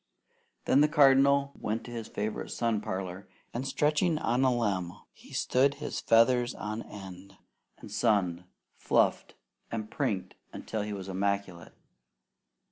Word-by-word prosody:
Then 140 - +4
the 150 - +6
Cardinal 140 -2 +5
went 110 +2 -3
to 120 - -10
his 115 -2 -5
favourite 105 +1 -4
sun 115 -3 -1
parlour, 95 -1 -5 0.2
and 125 +3 -3
stretching 155 +4 +1
on 125 -2 +1
a 130 - +4
limb, 100 -8 -1 0.2
he - - -18
stood 135 +2 +2
his 145 - -4
feathers 120 +2 +3
on 110 +2 -4
end, 95 -2 -11 0.4
and - - -12
sunned, 90 -4 +1 0.3
fluffed - - +1 0.3
and 110 -2 -5
prinked 115 -10 -2 0.2
until 110 - -4
he 105 +1 -4
was 100 -2 -6
immaculate. 95 -2 -3
110 Hz, 135 wpm, -29 LUFS, 100-135 Hz, 0.4 s, the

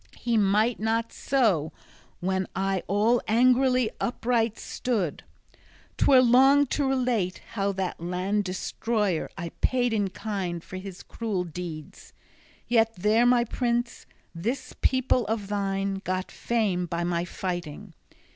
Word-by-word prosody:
He 235 -1 -1
might 215 +3 +2
not 225 +1 -1
so, 205 - +1 0.5
when 190 +1 -1
I 195 0 0
all 215 +5 +2
angrily 255 +1 +3
upright 230 -2 0
stood. 210 - -2 0.7
'Twere 260 -2 +5
long 270 +4 +6
to 280 -2 +1
relate 245 -8 0
how 200 -2 0
that 185 -3 -3
land 185 +4 -1
destroyer 195 0 -1
I 170 -2 -4
paid 245 -2 +1
in 205 -3 +1
kind 185 -4 -4
for 185 - -8
his 190 -1 -8
cruel 210 -6 -3
deeds; 165 -2 -8 0.5
yet 225 -1 +3
there, 215 +6 +3
my 245 -1 +4
prince, 240 0 -2 0.3
this 220 +11 -3
people 260 -1 +2
of 210 -2 -2
thine 195 -1 -1
got 185 0 -3
fame 200 -7 -1
by 170 +1 -2
my 170 -1 0
fighting. 175 0 -5
210 Hz, 130 wpm, -26 LUFS, 185-235 Hz, 0.7 s, long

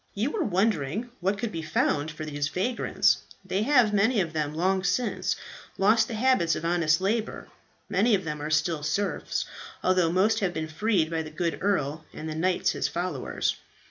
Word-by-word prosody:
You 225 +8 0
were 410 - -1
wondering 205 - 0
what 190 +3 0
could 225 +1 -3
be 165 - -4
found 155 -1 0
for 155 0 -6
these 145 -1 -2
vagrants. 230 +10 +1 0.3
They 190 - -1
have 240 -3 +4
many 215 +3 +3
of 165 -4 -1
them 150 -1 -2
long 185 +3 +1
since 245 +4 0 0.4
lost 220 +3 +4
the 230 - -4
habits 220 -8 +3
of 165 - -4
honest 165 -2 +2
labour. 215 +3 -2 0.4
Many 220 +2 +3
of 190 - -2
them 150 -2 -4
are 150 - -3
still 155 0 +1
serfs, 200 +7 -1 0.4
although 180 -3 +3
most 190 +5 +3
have 185 -3 -1
been 160 0 -2
freed 175 -2 +1
by 165 -1 0
the 155 - -7
good 165 +2 -2
earl 160 -6 0
and 155 - -6
the 155 - -3
knights 180 +3 +1
his - - -1
followers. 170 -6 -2
185 Hz, 185 wpm, -27 LUFS, 155-210 Hz, 0.4 s, have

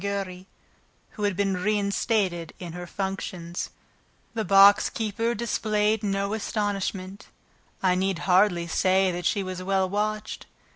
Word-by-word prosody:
Giry, 195 -2 -4 0.6
who 210 - -3
had 205 -2 0
been 200 -1 +1
reinstated 200 -3 0
in 175 -3 -7
her 175 0 -7
functions. 185 -3 -4 0.6
The 225 -1 -1
box 195 +1 +6
keeper 225 +2 -2
displayed 215 -1 0
no 200 -1 -1
astonishment. 200 -2 -3 0.6
I 185 -1 +4
need 190 0 0
hardly 180 -2 +3
say 185 +2 +2
that 175 -1 -2
she 200 - 0
was 185 -1 -5
well 190 0 +1
watched. 210 +2 -3
195 Hz, 130 wpm, -26 LUFS, 185-210 Hz, 0.6 s, box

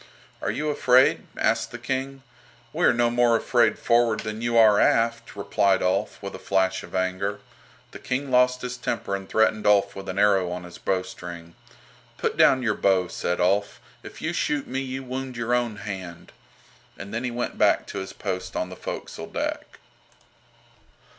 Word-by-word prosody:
"Are - - -1
you 155 0 -2
afraid?" 130 -2 +3
asked - - +1
the - - -7
King. 135 +1 -4 0.5
"We - - +1
are - - +6
no 120 -1 +2
more 120 -1 +3
afraid 120 +1 +2
forward 115 -2 +2
than 110 0 -5
you 120 0 +1
are 110 -2 +6
aft," 115 0 +1
replied 100 -1 +1
Ulf, 95 +3 0
with 100 - -5
a - - -8
flash 95 -1 0
of - - -10
anger. 95 +2 -1 0.5
The - - -10
King 135 +2 -3
lost 125 0 +3
his 125 0 -4
temper 100 -5 -2
and 95 -1 -8
threatened 110 -1 +2
Ulf 100 -1 +3
with 95 0 -7
an 95 - -4
arrow 100 -3 +3
on 90 0 -5
his 90 0 -11
bowstring. 90 -3 -4 0.6
"Put - - -1
down 130 -1 +5
your 110 -3 +2
bow," 95 -3 +2
said 90 - -2
Ulf. 100 +3 +1 0.2
"If - - -11
you - - -1
shoot 145 -2 -1
me 130 +1 -3
you 135 0 -4
wound 130 0 -5
your 120 +1 -1
own 120 -3 0
hand," 95 -4 -8 0.7
and 100 +2 -9
then 115 +2 -2
he 125 - -1
went 120 0 -4
back - - +3
to - - -6
his 95 - -6
post 95 0 -5
on 90 - -2
the 90 - -8
forecastle - - -7
deck. - - -4
110 Hz, 180 wpm, -25 LUFS, 95-125 Hz, 0.7 s, are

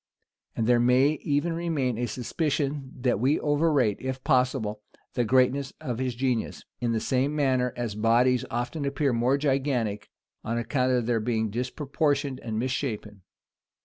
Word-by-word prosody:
[*] - - -52
And 115 - 0
there 120 +1 +4
may 130 +5 +3
even 145 +3 0
remain 150 -8 -1
a 120 - 0
suspicion, 140 +1 -2
that 125 -5 +1
we 135 +6 +2
overrate, 145 -7 +2
if 130 0 -4
possible, 125 -6 +1 0.3
the 120 - +1
greatness 130 +3 +2
of 120 -2 -4
his 130 -2 -1
genius; 125 -2 -1 0.2
in 120 -1 0
the 115 - +1
same 135 +5 0
manner 130 -4 +1
as 120 -3 -2
bodies 120 +4 +3
often 120 +6 -3
appear 140 -1 0
more 120 +4 +2
gigantic, 130 -7 -1 0.3
on 115 +1 -2
account 125 +2 0
of 125 -2 +1
their 115 -1 +1
being 110 -1 -1
disproportioned 140 +3 -1
and 110 -4 -4
misshapen. 110 -5 -3
130 Hz, 155 wpm, -27 LUFS, 120-140 Hz, 0.3 s, there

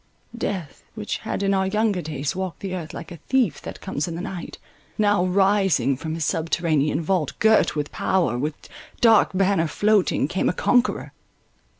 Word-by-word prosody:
Death, 190 -10 -4
which 215 -1 -3
had 220 - -3
in 195 0 +2
our 190 0 +1
younger 210 -2 +1
days 150 -1 -3
walked 185 -3 -4
the 195 -2 -4
earth 170 -4 -5
like 170 - -8
"a 170 - -8
thief 240 - 0
that - - -8
comes 145 - -3
in 170 - -4
the 170 - -4
night," 185 -3 -6 0.4
now, 205 -3 +3
rising 190 - +2
from 160 +4 -5
his 165 -2 -2
subterranean 160 -3 0
vault, 165 -4 -1
girt 220 -7 +3
with 145 -1 -3
power, 175 - 0
with 145 +5 -2 0.4
dark 225 -3 +5
banner 190 -3 +2
floating, 205 -6 +2
came 185 +4 0
a - - 0
conqueror. 245 +6 +1
185 Hz, 175 wpm, -23 LUFS, 155-200 Hz, 0.4 s, dark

